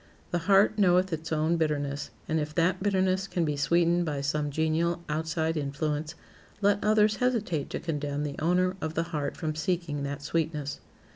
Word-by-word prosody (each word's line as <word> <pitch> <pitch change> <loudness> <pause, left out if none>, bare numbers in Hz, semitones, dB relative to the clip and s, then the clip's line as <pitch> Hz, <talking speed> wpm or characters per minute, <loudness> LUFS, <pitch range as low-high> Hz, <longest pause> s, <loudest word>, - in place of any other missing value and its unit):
The 175 - +1
heart 200 +2 +5
knoweth 185 -1 +4
its 160 0 -4
own 160 +2 +2
bitterness, 145 -3 -1 0.2
and 160 0 +1
if 150 0 -4
that 180 +2 +2
bitterness 190 -1 +1
can 175 -3 0
be 150 -1 -1
sweetened 170 +4 +2
by 150 -4 -2
some 145 +1 -1
genial 160 +3 0
outside 160 +1 -1
influence, 150 +2 -2 0.4
let 205 0 +2
others 210 0 +4
hesitate 220 - 0
to - - -3
condemn 145 -3 -2
the 145 -1 -3
owner 180 +3 +2
of 160 0 -3
the 165 - +1
heart 145 -2 -2
from 155 -2 -2
seeking 155 -2 -2
that 140 0 -4
sweetness. 150 -2 -2
160 Hz, 170 wpm, -28 LUFS, 150-180 Hz, 0.4 s, heart